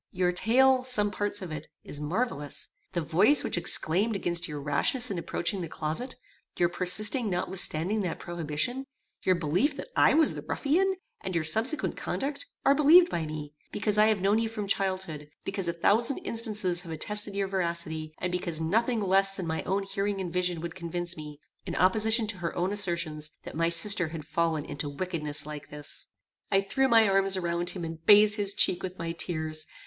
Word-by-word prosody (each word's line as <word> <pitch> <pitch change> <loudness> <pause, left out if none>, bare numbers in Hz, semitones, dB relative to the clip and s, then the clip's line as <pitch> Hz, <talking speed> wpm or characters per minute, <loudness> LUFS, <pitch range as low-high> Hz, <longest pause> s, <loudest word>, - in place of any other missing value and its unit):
Your 180 -1 +1
tale, 255 +7 +3
some 210 -5 +3
parts 205 -1 -2
of 175 - -7
it, 150 -1 -6 0.2
is 145 - -8
marvellous; 150 - -2 0.2
the 175 - -1
voice 175 - +4
which - - 0
exclaimed 180 +5 +1
against 170 -3 -1
your 150 -2 -6
rashness 175 - +1
in 185 - -2
approaching 180 +3 -2
the 170 - -4
closet, 160 +13 -4 0.4
your 175 - +2
persisting 210 +7 +3
notwithstanding 185 +1 +1
that 180 -4 -3
prohibition, 175 - -3 0.3
your 185 - +2
belief 175 - 0
that - - -7
I - - +4
was 320 0 +4
the - - -6
ruffian, 375 +7 0 0.3
and 190 -2 -4
your 165 - +1
subsequent 225 - +1
conduct, 280 +1 -3 0.2
are 275 - +6
believed 330 +5 +6
by 160 -2 -2
me, 150 -1 -7 0.2
because 210 0 +1
I 215 - +6
have 215 -3 +1
known 200 +3 +2
you 225 0 -1
from 215 -2 -5
childhood, 185 -7 -2 0.2
because 195 -2 -2
a - - +1
thousand 220 +9 +2
instances 210 -6 0
have 170 -3 -10
attested 205 +5 0
your 200 -1 -1
veracity, 170 -4 -3
and 180 - -3
because 175 -3 -2
nothing 225 +8 0
less 195 0 +3
than 185 - -4
my 160 -1 -2
own 195 +1 -1
hearing 195 0 -3
and 180 -3 -5
vision 180 -2 -1
would 170 0 -5
convince 175 0 -4
me, 150 -2 -9 0.3
in - - -4
opposition 220 +5 +3
to 210 -2 -2
her 170 -1 -4
own 180 +3 -1
assertions, 170 -6 -1
that - - -9
my 165 +1 +1
sister 185 +1 +3
had 155 -1 -8
fallen 165 -3 -1
into 145 -1 -4
wickedness 150 -2 -2
like 150 -1 -8
this." 150 -1 -3 0.4
I 195 - +4
threw 265 +7 0
my 225 -3 +5
arms 195 0 +3
around 175 -1 -1
him, 180 -3 -3
and 165 0 -8
bathed 210 +3 +6
his 200 -1 -1
cheek 175 - +4
with 185 0 -6
my 165 0 -4
tears. 155 -2 -3
185 Hz, 190 wpm, -28 LUFS, 165-210 Hz, 0.4 s, are